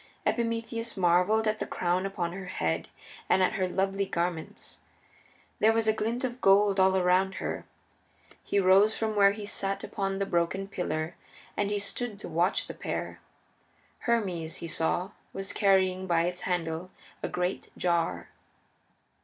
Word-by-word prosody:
Epimetheus 230 -1 -1
marveled 185 +5 +3
at 215 0 0
the - - -2
crown 180 +2 0
upon 175 -3 -3
her 190 0 -6
head 80 - -2 0.4
and 190 - +4
at 185 - +2
her 190 -4 0
lovely 195 +1 0
garments. 170 -2 -3 0.8
There 220 +1 +5
was 225 -1 +1
a 220 - +5
glint 225 +3 -2
of 255 0 -3
gold 195 0 +5
all 190 0 +5
around 185 +1 +3
her. - - -4 0.8
He 200 - +1
rose 195 +3 +5
from 220 -1 -1
where 200 -1 +7
he 210 0 -6
sat 195 -1 -1
upon 195 -1 -2
the 200 - 0
broken 185 +2 0
pillar 160 -4 -3 0.4
and 205 -1 0
he 205 - 0
stood 205 +2 -3
to - - -6
watch 175 +4 +1
the - - -7
pair. - - -4 0.8
Hermes, 185 -9 -1
he 170 - -6
saw, 175 +4 0 0.2
was 195 0 -4
carrying 190 -2 +3
by 170 -2 +3
its 180 +1 -2
handle 170 0 -2 0.3
a - - -2
great 180 +1 -2
jar. 165 - 0
190 Hz, 155 wpm, -29 LUFS, 175-205 Hz, 0.8 s, where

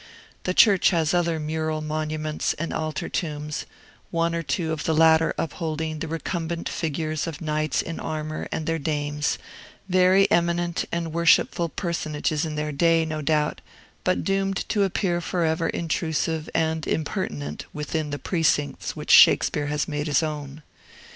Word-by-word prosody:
The 180 - 0
church 200 -5 +6
has 165 -4 +1
other 170 -2 +1
mural 155 0 -2
monuments 155 0 -2
and 165 +2 -4
altar 155 -1 -3
tombs, 150 -3 -3 0.4
one 170 0 0
or 170 - -1
two 165 0 -2
of 155 -2 -3
the 160 - +1
latter 160 0 +5
upholding 160 -1 -3
the 160 - -4
recumbent 165 +1 -3
figures 155 0 -2
of 160 -3 -5
knights 155 -1 0
in 165 - -5
armor 155 0 -4
and 160 - -3
their 165 0 -1
dames, 150 0 -1 0.5
very 185 +1 +5
eminent 170 0 +1
and 170 -2 -2
worshipful 170 0 +3
personages 155 -3 -2
in 155 -1 -4
their 150 0 -2
day, 165 +2 +3
no 155 -1 -3
doubt, 150 0 0 0.4
but 185 - +1
doomed 195 0 0
to 210 - +1
appear 180 -2 0
forever 165 -1 0
intrusive 160 -1 -1
and 160 -1 0
impertinent 75 - -3
within 150 +1 -3
the 145 - -3
precincts 150 -4 0
which - - -3
Shakespeare 145 -1 +6
has 150 +1 -1
made 150 0 -2
his 150 +1 +2
own. 150 -1 -5
160 Hz, 150 wpm, -25 LUFS, 150-170 Hz, 0.5 s, church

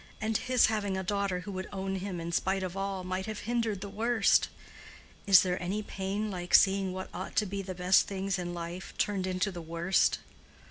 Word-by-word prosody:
And 220 +1 -1
his 255 +3 +4
having 205 -3 0
a 190 - -2
daughter 200 -1 -1
who 200 - -7
would 185 0 -5
own 195 -1 -3
him 185 -2 -4
in 165 +1 -4
spite 190 +3 0
of 185 0 -4
all, 195 -1 -3
might 185 +2 -3
have 215 -1 -5
hindered 230 -4 -1
the 200 - -4
worst. 220 +2 +2 0.8
Is 195 -3 +8
there 180 0 -1
any 195 +4 -2
pain 200 +2 -3
like 180 -1 +1
seeing 195 -1 +4
what 185 0 -6
ought 185 +2 -6
to 215 - +3
be 200 0 -3
the 185 -1 -6
best 180 +1 +4
things 195 -1 -2
in 175 -1 -3
life 175 +1 -6
turned 195 -3 0
into 185 +2 0
the 175 -2 -7
worst? 170 +3 +2
190 Hz, 205 wpm, -30 LUFS, 185-200 Hz, 0.8 s, Is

